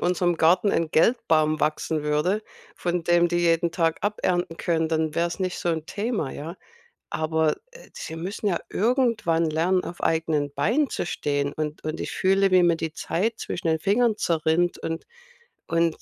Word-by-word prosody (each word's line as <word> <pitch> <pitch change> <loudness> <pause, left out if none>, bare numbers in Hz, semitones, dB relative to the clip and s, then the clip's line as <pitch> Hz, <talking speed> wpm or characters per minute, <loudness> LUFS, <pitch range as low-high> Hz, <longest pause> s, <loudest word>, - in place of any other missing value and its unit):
unserem 175 -1 +1
Garten 175 +6 +3
ein 165 -2 0
Geldbaum 155 -6 +2
wachsen 155 0 0
würde, 150 +8 0 0.3
von 175 -1 -2
dem 175 0 +4
die 175 - 0
jeden 170 0 +2
Tag 165 -1 0
abernten 180 -5 -1
können, 160 -2 0
dann 160 -1 0
wär's 170 0 -1
nicht 185 -1 -2
so 175 - -2
'n 160 -2 -1
Thema, 205 - -2
ja? 165 +5 -7 0.5
Aber, 160 0 +1 0.2
äh, - - -15
sie 160 - -7
müssen 195 +5 -3
ja 175 -4 +1
irgendwann 225 -8 +1
lernen, 175 +4 +1
auf 175 - -8
eigenen 160 -3 +1
Beinen 275 - +1
zu - - -3
stehen 145 -3 -1
und 155 0 -4
und 155 +1 -3
ich - - -4
fühle, 195 +1 +2
wie 185 -1 +6
mir 170 -1 +4
die 160 -1 -4
Zeit 220 +9 -1
zwischen 170 - -4
den 160 0 +2
Fingern 215 +5 +2
zerrinnt 165 +1 +1
und 165 0 -4 0.6
und 165 -1 +1
170 Hz, 170 wpm, -25 LUFS, 160-185 Hz, 0.6 s, wie